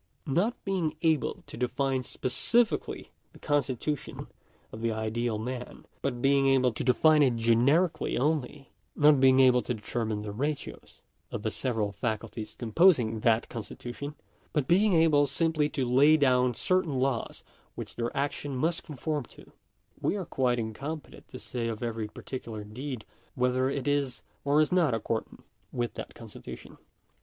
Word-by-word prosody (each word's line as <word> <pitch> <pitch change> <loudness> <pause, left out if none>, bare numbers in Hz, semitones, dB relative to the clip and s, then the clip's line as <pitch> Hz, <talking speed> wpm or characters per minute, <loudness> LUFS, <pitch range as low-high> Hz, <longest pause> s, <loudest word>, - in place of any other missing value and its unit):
Not 180 - +1
being 180 -6 -1
able 160 -3 +1
to - - -10
define 130 +2 0
specifically 215 - 0 0.2
the - - -14
constitution 145 0 -2 0.5
of 110 - -8
the 115 0 0
ideal 110 +1 -1
man, 125 +3 -6 0.2
but 125 -3 -3
being 135 0 +4
able 130 -2 +4
to 115 - -4
define 150 +5 +5
it 130 -4 +4
genetically 125 +10 +2
only 145 0 -1
— - - -44
not 145 -1 +5
being 130 0 +6
able 125 -1 +6
to 125 - -3
determine 110 -1 -3
the 105 - -5
ratios 145 +7 -5 0.3
of - - -5
the 110 - -1
several 110 -2 -1
faculties 110 0 -4
composing 120 - +3
that 115 +1 +2
constitution, 120 +5 -7 0.4
but 145 -4 0
being 195 +2 +4
able 155 -3 +4
simply 155 +1 +1
to 135 -3 -1
lay 140 +6 +5
down 125 -4 +3
certain 185 -4 +1
laws 130 -3 -1 0.3
which - - -7
their 120 0 -1
action 140 0 -2
must 160 +6 0
conform 150 -1 -3
to— - - -17 0.5
we - - +1
are 195 -3 -3
quite 125 -4 +1
incompetent 135 +7 -6
to - - -9
say 120 -2 -4
of 115 0 -4
every 115 -2 -2
particular 110 -1 -7
deed 125 +3 -6 0.3
whether 125 +1 +1
it 135 -1 -3
is 140 -3 0 0.2
or 145 +2 +4
is 155 - +1
not 170 -9 +3
accordant 115 0 -4 0.3
with 120 -2 -2
that - - -8
con - - -10
stitution. - - -11
130 Hz, 155 wpm, -29 LUFS, 115-150 Hz, 0.5 s, being